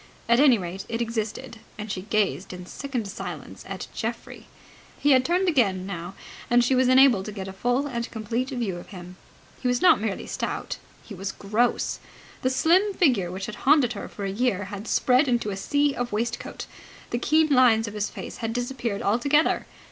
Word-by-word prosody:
At 235 +1 +4
any 270 -4 +6
rate, 185 0 -5
it 230 - -2
existed, 230 +1 -4 0.2
and 210 0 -5
she 185 - -3
gazed 200 -2 -1
in 180 0 -8
sickened 250 +1 -4
silence 195 - -7
at - - -5
Geoffrey. - - -5 0.5
He 290 - +2
had 260 -1 +6
turned 360 +5 +1
again 200 - +2
now, 180 -1 -6 0.3
and 240 0 +5
she 245 - +2
was 255 0 +3
enabled 255 -6 +5
to 210 - -5
get 195 -2 -6
a 190 - -7
full 245 +7 0
and 235 -4 -3
complete 230 +3 -3
view 235 -9 -2
of 175 - -10
him. 180 -1 -10 0.4
He 255 - -1
was 245 0 +2
not 360 - +5
merely 215 -3 -3
stout. - - -4 0.3
He 220 - -10
was 190 0 -4
gross. 215 +5 0 0.4
The 255 - +2
slim 365 +9 +3
figure 240 - +2
which 190 +1 -5
had 215 - -6 0.2
haunted 280 -6 +5
her 200 - -6
for 200 - -6
a 195 - -2
year 205 -2 0
had 205 +2 -6
spread 255 +5 +3
into 235 -4 0
a - - -3
sea 285 +8 +1
of 245 -2 -3
waistcoat. 230 +3 -3 0.5
The 240 - 0
keen 310 +4 +3
lines 245 -5 +5
of 210 - -6
his 210 -1 -2
face - - -8
had 225 0 -3
disappeared 240 -4 -3
altogether. 280 +9 +2
235 Hz, 195 wpm, -25 LUFS, 200-260 Hz, 0.5 s, any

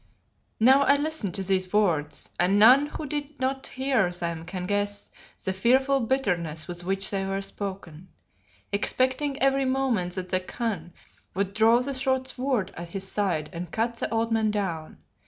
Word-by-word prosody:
Now 260 +5 +6
I 280 0 +5
listened 290 - -2
to 195 - -3
these 185 -1 +1
words 155 -9 +1
and 180 +3 +3
none 255 +7 +7
who 300 - -6
did 290 0 -5
not 265 +1 -2
hear 260 -8 +1
them 170 -2 -4
can 180 0 -5
guess 205 +1 -2 0.3
the 190 - -1
fearful 260 +7 +3
bitterness 180 - -1
with 175 -1 -7
which 195 +2 -1
they 195 -1 -1
were 195 0 -2
spoken 190 -4 -7 0.6
expecting 260 +7 0
every 270 0 +3
moment 255 -9 0
that 185 -1 -4
the 185 - +2
Khan 185 -3 -4 0.4
would 195 0 -1
draw 225 +3 +5
the 275 +2 -3
short 260 0 0
sword 255 -5 -1
at 170 0 -7
his 195 +2 -4
side 180 -7 -1
and 170 0 -6
cut 230 +1 -1
the - - -3
old 230 0 0
man 220 -1 +2
down. 185 -7 -3
205 Hz, 170 wpm, -26 LUFS, 185-260 Hz, 0.6 s, none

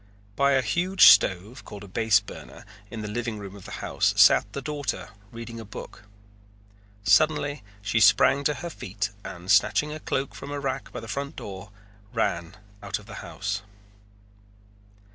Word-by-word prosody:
By 140 0 +3
a 130 -1 +3
huge 185 +6 +3
stove, 105 +6 +3
called 100 0 -10
a - - -10
base 110 +1 +3
burner, 100 - -12 0.2
in 110 -2 -6
the - - -4
living 115 +1 -3
room 100 -1 -9
of 100 - -13
the - - -7
house - - +1
sat 100 - +6
the 140 - -4
daughter 145 -1 -4 0.2
reading 115 0 -8
a - - -7
book. 100 0 -10 1.0
Suddenly 145 +8 +3 0.2
she 115 +3 +1
sprang 135 +6 +5
to 150 - +2
her 170 - -4
feet 100 -5 -4
and, 90 +2 -5
snatching 150 +9 +3
a 155 - -6
cloak 135 -2 -2
from 140 - -9
a 145 0 -3
rack 135 -1 -4
by - - -6
the 115 - -9
front 140 +5 -4
door, 95 0 -8 0.4
ran 85 +3 -1 0.2
out - - -3
of - - -14
the - - -11
house. 100 +1 -4
115 Hz, 170 wpm, -26 LUFS, 100-140 Hz, 1.0 s, sat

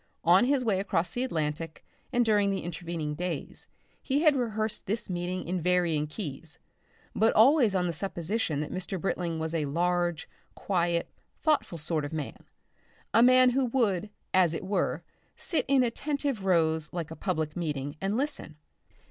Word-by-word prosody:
On 180 +7 +6
his 265 -1 +1
way 200 -4 +2
across 180 -3 0
the 245 - -2
Atlantic 160 - -3 0.3
and 245 0 +2
during 205 -2 +3
the 195 - -1
intervening 165 -2 -4
days, 170 -1 -5 0.3
he 285 +3 0
had 305 -3 +5
rehearsed 220 -4 -2
this 210 0 -2
meeting 180 +1 -3
in 180 0 -1
varying 170 -3 +1
keys, 155 -2 -7 0.6
but 225 +1 +3
always 235 -2 +5
on 180 -1 +2
the 170 - -1
supposition 170 -2 -2
that 150 - -5
Mr. 185 +1 -4
Britling 170 -2 -2
was 160 0 -3
a 160 -3 0
large, 175 +2 0 0.3
quiet, 170 -3 -1 0.2
thoughtful 300 - +1
sort 155 0 -1
of 145 +2 -5
man, 150 -3 -5 0.7
a 225 - +6
man 255 +1 +6
who 265 +1 +2
would, 215 -6 0 0.2
as 175 -3 +4
it 185 - -5
were, 200 +1 -1 0.3
sit 330 - -1
in 270 -1 +4
attentive 275 -2 -2
rows 160 -4 +2
like 170 -3 -4
a - - -6
public 160 -6 -2
meeting 145 -4 -3
and 195 +3 0
listen. 275 - -3
180 Hz, 165 wpm, -28 LUFS, 160-225 Hz, 0.7 s, On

